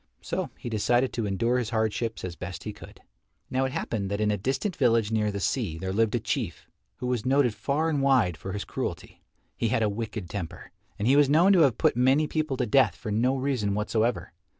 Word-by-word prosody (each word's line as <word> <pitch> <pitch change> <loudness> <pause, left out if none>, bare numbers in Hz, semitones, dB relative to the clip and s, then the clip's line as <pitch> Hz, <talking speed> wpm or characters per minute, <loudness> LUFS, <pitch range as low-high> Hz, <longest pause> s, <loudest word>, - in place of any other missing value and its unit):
So - - -3
he - - -8
decided 120 +3 +1
to 115 -3 -2
endure 115 +6 +1
his 120 -3 -3
hardships 110 0 -1
as 90 -2 -5
best 90 +1 -7
he 105 - -5
could. - - -14 0.5
Now 130 +1 +1
it 130 - -2
happened 100 -6 -3
that 100 +1 -2
in 105 0 +2
a - - +1
distant 135 - -2
village 115 -4 +2
near 105 -1 +1
the 100 - -4
sea 100 - -1
there 95 +2 -4
lived 110 +2 +2
a - - +1
Chief - - -3 0.3
who 125 - -6
was 125 -3 -1
noted 130 -2 +3
far 145 +7 -1
and 150 -4 0
wide 130 -11 +3
for 95 +5 -7
his 105 - -4
cruelty. - - -5 0.3
He 115 - 0
had 115 0 +1
a 105 - +2
wicked 110 -2 -5
temper, 85 -4 -7 0.3
and 105 - -1
he 135 - +5
was 145 -1 +5
known 170 +7 +5
to 185 - +5
have 140 -7 +4
put - - +2
many 130 +5 +3
people 155 -3 -2
to - - 0
death 135 +5 +3
for 115 -4 -6
no 125 +6 +2
reason 130 -7 -1
whatsoever. 110 +3 -1
115 Hz, 225 wpm, -27 LUFS, 105-130 Hz, 0.5 s, he